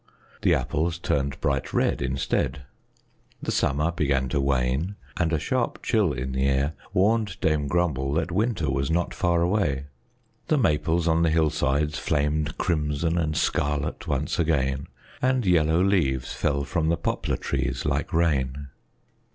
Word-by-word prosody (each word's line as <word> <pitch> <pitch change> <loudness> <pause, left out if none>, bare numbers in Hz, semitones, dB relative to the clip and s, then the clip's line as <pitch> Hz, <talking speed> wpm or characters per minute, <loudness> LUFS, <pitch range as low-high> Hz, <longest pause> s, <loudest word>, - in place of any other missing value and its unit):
The - - +4
apples 85 +3 -1
turned 70 -5 -1
bright 70 -1 -1
red - - +1
instead. 65 +1 -1 0.8
The - - -3
summer 75 +4 +1
began 70 -5 0
to 70 - 0
wane, 70 +7 0 0.2
and 85 -2 +1
a 80 - +2
sharp 120 - -2
chill 105 -8 +2
in 65 -1 -4
the 65 +1 0
air 70 +3 +1 0.2
warned 105 0 +1
Dame 75 -2 +1
Grumble 70 -5 0
that 80 +3 -1
winter 100 -4 0
was 70 +1 -1
not 85 +1 0
far 85 -1 +1
away. 85 -8 0 0.6
The 155 - +3
maples 80 - +1
on 80 0 +3
the 85 - +3
hillsides 75 -1 +1
flamed 75 0 0
crimson 80 0 0
and 75 -2 -1
scarlet 75 +4 -1
once 75 +2 -1
again, 70 -4 0 0.3
and 130 -2 +2
yellow 85 -1 +3
leaves 70 -10 +1
fell 70 -2 0
from 80 +2 -1
the 85 - +2
poplar 85 - -1
trees - - -2
like 75 0 -1
rain. 70 -4 0
75 Hz, 150 wpm, -25 LUFS, 70-85 Hz, 0.8 s, The